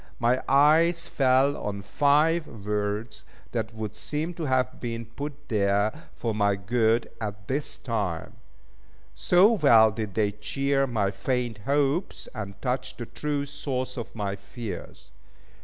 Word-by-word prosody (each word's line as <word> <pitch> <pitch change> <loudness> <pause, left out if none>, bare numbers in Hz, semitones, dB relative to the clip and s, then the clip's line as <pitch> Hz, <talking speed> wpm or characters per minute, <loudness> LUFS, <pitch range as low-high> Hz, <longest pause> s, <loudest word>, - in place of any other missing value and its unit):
My 120 +2 +2
eyes 160 +5 +4
fell 135 +1 +3
on 100 -1 -4
five 150 - +3 0.2
words, 105 +2 -2 0.3
that 110 - -2
would 110 -2 -4
seem 150 +11 -3
to 165 -2 -4
have 130 -2 0
been 115 -1 -4
put 145 +5 -7
there 100 -1 +2 0.2
for 115 -2 -3
my 100 -1 +2
good 115 +4 +1
at 105 -1 -5
this 140 +2 -2
time; 100 -9 -3 0.8
so 185 +5 +5
well 120 - +6
did 105 -2 -5
they 105 -2 +2
cheer 135 +6 0
my 105 -5 0
faint 120 +2 -2
hopes, 145 +5 0
and 100 -4 -6
touch 130 0 -2
the 120 - -5
true 145 +3 -2
source 130 -2 -4
of 120 -2 -7
my 100 -2 -2
fears. 100 - -8
120 Hz, 140 wpm, -27 LUFS, 105-140 Hz, 0.8 s, well